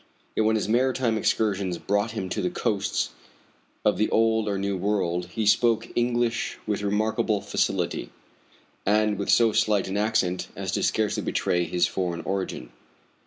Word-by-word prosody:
Yet 110 Hz, -, +2 dB
when 110 Hz, -, +3 dB
his 110 Hz, -, -1 dB
maritime 125 Hz, 0 st, +2 dB
excursions 100 Hz, -4 st, 0 dB
brought 100 Hz, +4 st, 0 dB
him 95 Hz, -, -2 dB
to 105 Hz, -, -2 dB
the 90 Hz, -, 0 dB
coasts 100 Hz, +3 st, -1 dB, 0.7 s
of -, -, +3 dB
the 110 Hz, -, +2 dB
old 110 Hz, -1 st, +2 dB
or 100 Hz, -, -1 dB
new 100 Hz, 0 st, -1 dB
world 90 Hz, -3 st, -1 dB
he 110 Hz, +4 st, -3 dB
spoke 115 Hz, +1 st, +3 dB
English 120 Hz, -1 st, 0 dB
with 105 Hz, -1 st, -1 dB
remarkable 110 Hz, +1 st, 0 dB
facility, -, -, -1 dB, 0.7 s
and 105 Hz, 0 st, +2 dB
with 100 Hz, -, -3 dB
so 115 Hz, -2 st, +5 dB
slight 105 Hz, -3 st, +2 dB
an 95 Hz, +1 st, -2 dB
accent 105 Hz, -4 st, 0 dB
as -, -, -3 dB
to -, -, -1 dB
scarcely -, -, +1 dB
betray 90 Hz, 0 st, 0 dB
his 85 Hz, +2 st, +1 dB
foreign 90 Hz, -3 st, -2 dB
origin. 95 Hz, -10 st, -4 dB
105 Hz, 160 wpm, -25 LUFS, 95-110 Hz, 0.7 s, so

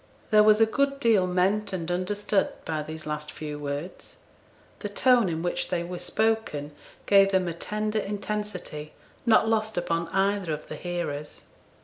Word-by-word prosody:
There 215 Hz, -1 st, +7 dB
was 215 Hz, 0 st, +6 dB
a 225 Hz, -, +7 dB
good 275 Hz, +4 st, 0 dB
deal 220 Hz, -8 st, +4 dB
meant 195 Hz, +3 st, +1 dB
and 175 Hz, -2 st, -3 dB
understood 195 Hz, +3 st, 0 dB, 0.2 s
by 155 Hz, -1 st, -2 dB
these 155 Hz, +1 st, -7 dB
last 150 Hz, 0 st, -4 dB
few 150 Hz, -1 st, -6 dB
words. 145 Hz, +4 st, -5 dB, 0.6 s
The 205 Hz, -, -4 dB
tone 240 Hz, 0 st, +4 dB
in 165 Hz, 0 st, -3 dB
which 175 Hz, -, -1 dB
they 175 Hz, -2 st, 0 dB
were 175 Hz, 0 st, -6 dB
spoken 220 Hz, -10 st, 0 dB, 0.3 s
gave 195 Hz, -1 st, +6 dB
them 190 Hz, -2 st, +2 dB
a 170 Hz, -, -2 dB
tender 215 Hz, +5 st, -2 dB
intensity 205 Hz, -7 st, -4 dB, 0.3 s
not 220 Hz, -1 st, +5 dB
lost 220 Hz, -2 st, 0 dB
upon 170 Hz, -1 st, 0 dB
either 195 Hz, 0 st, 0 dB
of 150 Hz, -, -6 dB
the -, -, -5 dB
hearers. 150 Hz, -3 st, -4 dB
185 Hz, 160 wpm, -27 LUFS, 165-210 Hz, 0.6 s, There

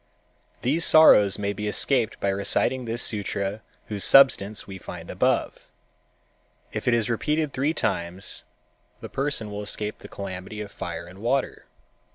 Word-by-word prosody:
These 150 Hz, +7 st, +1 dB
sorrows 105 Hz, -11 st, +6 dB
may 100 Hz, 0 st, -2 dB
be 105 Hz, +1 st, -5 dB
escaped 115 Hz, +1 st, +2 dB
by 100 Hz, -, 0 dB
reciting 100 Hz, +6 st, +1 dB
this 115 Hz, +1 st, 0 dB
sutra 100 Hz, -1 st, -2 dB, 0.2 s
whose 105 Hz, -2 st, -3 dB
substance 110 Hz, -7 st, +5 dB
we 95 Hz, -1 st, -9 dB
find -, -, -9 dB
above. -, -, -1 dB, 1.0 s
If -, -, -5 dB
it 120 Hz, -, +4 dB
is 115 Hz, -2 st, 0 dB
repeated 150 Hz, +5 st, -1 dB
three 145 Hz, +5 st, 0 dB
times 85 Hz, +3 st, -2 dB, 0.6 s
the -, -, -9 dB
person 135 Hz, -6 st, -2 dB
will 105 Hz, 0 st, -5 dB
escape 105 Hz, +1 st, -4 dB
the -, -, -11 dB
calamity 95 Hz, +1 st, -7 dB
of 105 Hz, -1 st, -7 dB
fire 85 Hz, -3 st, -6 dB
and 90 Hz, +2 st, -14 dB
water. 125 Hz, +5 st, -2 dB
105 Hz, 150 wpm, -25 LUFS, 100-130 Hz, 1.0 s, sorrows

